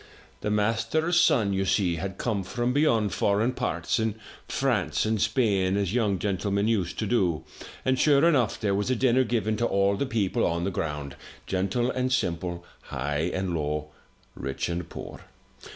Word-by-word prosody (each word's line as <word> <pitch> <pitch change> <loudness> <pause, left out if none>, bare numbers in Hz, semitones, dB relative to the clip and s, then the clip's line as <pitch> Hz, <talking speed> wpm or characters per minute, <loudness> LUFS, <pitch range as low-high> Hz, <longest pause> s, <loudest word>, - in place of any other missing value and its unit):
"The - - -2
master's 115 +11 +2
son, 115 - +3
you 95 0 +1
see, 95 -3 +1
had 95 +4 -5
come 110 -5 -1
from 120 +6 -2
beyond 115 -8 +2
foreign 105 +5 +2
parts 125 - -1
in 110 -1 0 0.3
France 105 - 0
and 110 -2 0
Spain 100 -4 +2
as 100 -1 -1
young 105 -5 +1
gentlemen 100 +2 0
used 95 -6 0
to 110 - -1
do, 95 -8 +1 0.4
and, 130 0 +2
sure 145 +1 +5
enough, 135 -9 +2
there 100 -2 0
was 105 +4 0
a 130 - +2
dinner 130 +1 +3
given 110 -2 0
to 120 - +1
all 100 0 +2
the 140 - -2
people 110 -7 0
on 85 +1 0
the 95 - -1
ground, 75 -6 -4 0.3
gentle 100 +7 0
and 130 0 -1
simple, 85 -7 -1 0.2
high 75 +5 -2
and 95 -1 -2
low, 75 -1 -2 0.4
rich 65 +6 -4
and 85 -1 -4
poor. - - -8
100 Hz, 170 wpm, -27 LUFS, 90-120 Hz, 0.4 s, sure